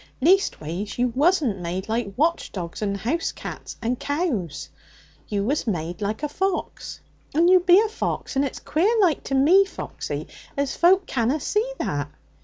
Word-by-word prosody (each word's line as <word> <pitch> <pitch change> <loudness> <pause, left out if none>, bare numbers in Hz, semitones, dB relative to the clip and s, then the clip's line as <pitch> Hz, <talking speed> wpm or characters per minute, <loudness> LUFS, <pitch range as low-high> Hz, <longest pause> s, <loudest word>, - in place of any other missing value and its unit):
'Leastways, 210 - +1
you 245 +1 +2
wasn't 280 - +2
made 180 +2 -4
like 225 -2 -1
watch 330 +4 +1
dogs 175 -1 -6
and 200 -1 -1
house 265 - -1
cats - - -8
and 245 +2 -1
cows. 280 - -2 0.6
You 200 -1 -1
was 270 +4 -1
made 175 -1 -3
a 205 +1 -1
fox, 380 +5 -3 0.4
and 335 +3 +5
you 370 0 +7
be 355 +1 +6
a 440 - +2
fox, 430 -8 -3
and 270 - +3
its 275 - -3
queer 380 +10 +1
like 355 -7 +3
to 270 - -1
me, 330 +9 +6
Foxy, 390 - -6 0.3
as 280 -1 -1
folk 370 +2 +4
canna 250 +4 0
see 430 - 0
that. 145 0 -2
275 Hz, 165 wpm, -24 LUFS, -, 0.6 s, you